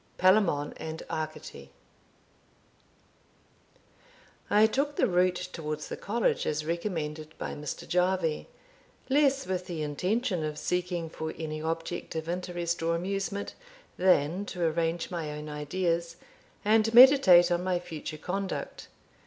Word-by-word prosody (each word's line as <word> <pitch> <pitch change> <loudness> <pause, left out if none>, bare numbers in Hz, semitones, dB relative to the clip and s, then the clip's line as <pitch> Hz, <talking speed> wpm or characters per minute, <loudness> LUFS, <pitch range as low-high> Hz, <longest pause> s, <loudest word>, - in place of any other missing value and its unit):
Palamon 185 -6 +3
and 160 0 -6
Arcite. 155 0 -6 2.8
I 210 +1 +6
took 280 +6 0
the - - +3
route 180 -2 +1
towards 155 -2 -5
the - - -4
college, 230 +2 0
as 150 0 -1
recommended 160 -3 -4
by - - -4
Mr. 150 -1 -6
Jarvie, 180 -3 0 0.6
less 275 -1 +3
with 185 -1 -3
the 165 -4 -3
intention 180 - -1
of 150 -1 -3
seeking 180 -2 -2
for 160 0 -6
any 155 -1 -4
object 165 +2 -4
of 160 0 -3
interest 175 -1 -2
or 165 +1 +1
amusement, 195 +3 -3 0.4
than 180 0 +2
to 180 -2 -4
arrange 165 +2 -1
my 160 -4 -3
own 150 0 -7
ideas, 170 +3 -2 0.5
and 220 +1 +4
meditate 235 -10 +8
on 175 +1 +1
my 185 -1 +1
future 160 -3 -7
conduct. 190 +5 -4
175 Hz, 125 wpm, -29 LUFS, 160-190 Hz, 2.8 s, meditate